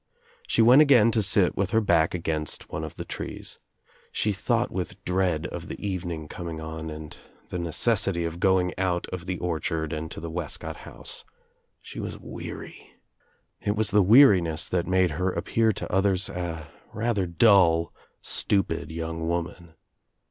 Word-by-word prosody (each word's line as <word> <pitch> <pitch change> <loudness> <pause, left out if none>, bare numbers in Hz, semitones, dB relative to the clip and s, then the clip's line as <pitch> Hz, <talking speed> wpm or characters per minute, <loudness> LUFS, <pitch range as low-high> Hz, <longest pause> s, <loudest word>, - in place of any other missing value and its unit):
She 115 - +3
went 125 +6 +8
again 125 -7 +6
to 110 - +1
sit 95 -1 +3
with 100 -1 0
her 110 - +3
back 85 -6 +2
against 80 -3 -3
one 80 - -4
of 80 - -7
the - - -6
trees. - - -6 0.5
She 105 - +1
thought 95 - 0
with 95 +1 -5
dread 90 -3 0
of - - -6
the - - -7
evening 85 -6 -4
coming 85 0 -6
on 80 0 -6
and 75 0 -8 0.3
the 90 - -4
necessity 85 +1 +1
of 85 +1 -5
going 90 -1 +2
out 90 -2 0
of 90 0 -6
the 90 0 -2
orchard 80 -2 -2
and 80 +1 -4
to - - -7
the 85 0 -6
Wescott 85 -2 -4
house. - - -9 0.6
She - - -9
was - - -5
weary. - - -9 0.7
It 105 - -1
was 110 -1 +2
the 105 +1 +5
weariness 90 - +5
that 90 -2 -1
made 90 -2 +2
her 90 +5 -1
appear 110 +4 +1
to - - -6
others 95 -1 +1
a 85 -3 -5 0.2
rather 105 -4 0
dull 85 -2 +4 0.3
stupid 100 -2 +1
young 80 0 -4
women. 85 -1 -4
90 Hz, 165 wpm, -26 LUFS, 80-100 Hz, 0.7 s, went